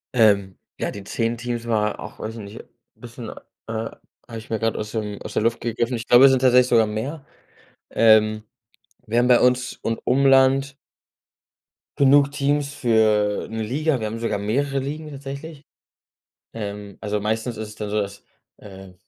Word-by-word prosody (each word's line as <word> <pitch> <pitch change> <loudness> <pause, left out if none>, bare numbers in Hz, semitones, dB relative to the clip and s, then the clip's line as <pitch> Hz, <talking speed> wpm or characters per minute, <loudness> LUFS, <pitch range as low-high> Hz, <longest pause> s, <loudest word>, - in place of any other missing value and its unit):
Ähm, 100 -5 +3 0.2
ja, - - -2
die 100 -1 -9
10 115 +3 -2
Teams 120 0 -4
war 105 -2 0
auch, 105 - -9
weiß 110 +1 -5
ich 115 - -8
nicht, 100 +1 -10 0.3
bisschen, - - -9
äh - - -7 0.9
habe 115 -2 -8
ich 110 - -10
mir 110 - -1
grad 115 -1 -1
aus 105 0 -5
dem 105 -2 -4
aus - - -8
der - - 0
Luft 115 +1 0
gegriffen. 120 +1 -2
Ich 115 - -8
glaube, 120 +2 +8
es 135 - +7
sind 130 - +3
tatsächlich 125 -1 +5
sogar 115 -3 +4
mehr. 135 +8 -5 0.7
Ähm, 110 -1 +4 0.6
wir 115 +1 +1
haben 120 - +3
bei 125 -1 +6
uns 125 0 +2
und 115 0 -2
Umland 135 +1 +4 1.2
genug 140 0 +5
Teams 145 0 -1
für 110 -4 +2
'ne 110 0 -4
Liga. 140 +5 0
Wir 110 - -2
haben 110 +2 -5
sogar 115 -3 -2
mehrere 135 +7 -1
Ligen 150 +3 -5
tatsächlich. 140 +2 -8 0.9
Ähm, 105 -2 -7
also 105 -1 -2
meistens 110 +3 -2
ist 110 0 -5
es 105 - -12
dann 105 -1 -5
so, 105 0 +1
dass, 100 0 -7 0.3
äh, 95 -2 -12
115 Hz, 175 wpm, -22 LUFS, 105-135 Hz, 1.2 s, glaube